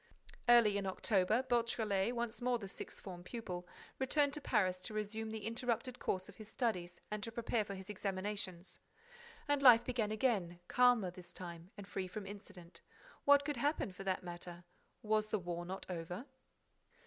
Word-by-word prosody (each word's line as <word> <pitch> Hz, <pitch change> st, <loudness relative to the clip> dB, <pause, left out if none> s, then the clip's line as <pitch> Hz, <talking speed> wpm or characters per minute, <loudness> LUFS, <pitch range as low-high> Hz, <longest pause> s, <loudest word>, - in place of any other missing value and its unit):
Early 220 Hz, -4 st, +7 dB
in 195 Hz, -, -3 dB
October, 195 Hz, +4 st, +2 dB
Beautrelet, 230 Hz, -3 st, +1 dB
once 235 Hz, 0 st, -2 dB
more 250 Hz, 0 st, +2 dB
the 205 Hz, -4 st, -7 dB
sixth -, -, -8 dB
form 180 Hz, -3 st, -8 dB
pupil, 180 Hz, -5 st, -5 dB, 0.3 s
returned 285 Hz, +2 st, +2 dB
to 300 Hz, -, -4 dB
Paris 185 Hz, -8 st, +2 dB
to 215 Hz, -, -5 dB
resume 220 Hz, +1 st, -2 dB
the 220 Hz, -2 st, -5 dB
interrupted 245 Hz, +1 st, -1 dB
course 185 Hz, -1 st, -1 dB
of 205 Hz, -, -13 dB
his 215 Hz, -1 st, -9 dB
studies 180 Hz, -8 st, -1 dB
and 210 Hz, 0 st, -2 dB
to 230 Hz, -, -4 dB
prepare 230 Hz, -1 st, 0 dB
for 200 Hz, -1 st, -6 dB
his 190 Hz, 0 st, -8 dB
examinations. 195 Hz, -2 st, -3 dB, 0.7 s
And 290 Hz, -1 st, +2 dB
life 240 Hz, -3 st, +9 dB
began 235 Hz, -4 st, 0 dB
again, 210 Hz, -7 st, +1 dB
calmer, 245 Hz, -7 st, +4 dB
this 180 Hz, 0 st, -11 dB
time, 170 Hz, -1 st, -8 dB
and 200 Hz, -1 st, -8 dB
free 190 Hz, -2 st, -3 dB
from 195 Hz, +2 st, -6 dB
incident. 195 Hz, -3 st, -10 dB, 0.4 s
What 285 Hz, 0 st, +7 dB
could 295 Hz, -3 st, -1 dB
happen, 285 Hz, -5 st, +1 dB
for 195 Hz, -, -8 dB
that 190 Hz, -1 st, -1 dB
matter. 175 Hz, 0 st, -7 dB, 0.4 s
Was 215 Hz, 0 st, +2 dB
the 215 Hz, -, 0 dB
war 175 Hz, -2 st, -4 dB
not 190 Hz, +1 st, -5 dB
over? 180 Hz, +5 st, -4 dB
210 Hz, 170 wpm, -37 LUFS, 185-235 Hz, 0.7 s, life